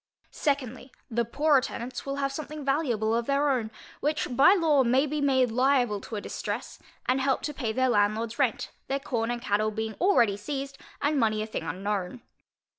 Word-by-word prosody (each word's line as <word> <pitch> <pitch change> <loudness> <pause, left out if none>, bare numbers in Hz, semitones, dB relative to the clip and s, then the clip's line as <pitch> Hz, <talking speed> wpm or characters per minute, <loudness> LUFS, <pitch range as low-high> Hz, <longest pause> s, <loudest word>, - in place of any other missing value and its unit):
Secondly, 260 -3 -2 0.2
The 235 +1 +1
poorer 290 +3 +3
tenants 245 +2 -6
will 275 - -2
have 275 -1 -1
something 300 0 -6
valuable 245 -7 +1
of 230 0 0
their 280 +1 +2
own, 235 -5 -1 0.3
which 295 -3 -1
by 290 +10 +7
law 310 -7 +3
may 255 +4 +3
be 300 0 -2
made 260 -4 +3
liable 250 -4 +2
to 225 - -7
a 205 - -3
distress, - - -5 0.3
and 260 +1 +1
help 270 0 +1
to 295 - -3
pay 245 -6 -2
their 260 +3 +1
landlordŌĆÖs 220 +3 +1
rent, 255 -6 0 0.2
their 275 +1 -1
corn 235 -4 -2
and 240 0 -3
cattle 215 -1 +1
being 220 0 -3
already 235 - +4
seized, 275 +5 -5 0.2
and 290 0 +2
money 215 -2 +1
a - - -3
thing 220 - -4
unknown. 200 +3 -3
255 Hz, 190 wpm, -27 LUFS, 220-280 Hz, 0.3 s, by